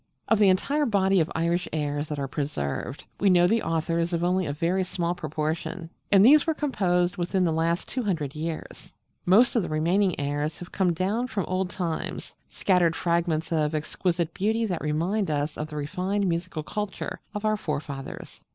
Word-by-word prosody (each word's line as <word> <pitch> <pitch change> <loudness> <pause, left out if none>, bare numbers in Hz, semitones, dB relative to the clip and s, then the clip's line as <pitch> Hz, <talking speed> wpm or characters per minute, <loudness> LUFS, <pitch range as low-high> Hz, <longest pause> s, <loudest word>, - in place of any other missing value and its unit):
Of 225 - +3
the 205 -2 +6
entire 280 +11 +2
body 195 -3 +3
of 160 - 0
Irish 170 +2 0
airs 145 -1 -2
that 150 - -4
are 140 -1 -2
preserved, 135 - -3 0.2
we 200 - +4
know 175 -1 +5
the 225 +5 +3
authors 165 +1 -1
of 170 0 0
only 180 0 +1
a - - -1
very 175 +5 0
small 175 -2 -1
proportion; 160 +2 -3 0.2
and 200 0 +7
these 300 +5 +7
were 320 - +1
composed 185 - +1
within 180 +2 0
the 170 - +2
last 165 +2 0
two 255 - -2
hundred 165 - -2
years. 160 +1 -6 0.4
Most 220 +9 +5
of 230 - +4
the - - -4
remaining 170 +4 +1
airs 145 +2 -2
have 175 - -10
come 190 -3 +2
down 205 +9 0
from 205 -7 -2
old 185 0 -1
times, 170 -4 -4 0.2
scattered 175 -4 +2
fragments 170 -2 0
of 155 -1 +1
exquisite 170 +2 -1
beauty 220 +3 0
that 185 -5 -2
remind 170 +7 0
us 150 0 -1
of 150 - -4
the 155 - -9
refined 185 +7 -1
musical 170 -2 -2
culture 210 +4 -4 0.2
of 210 +1 -3
our 215 0 +3
forefathers. 145 -7 -6
175 Hz, 185 wpm, -26 LUFS, 155-195 Hz, 0.4 s, and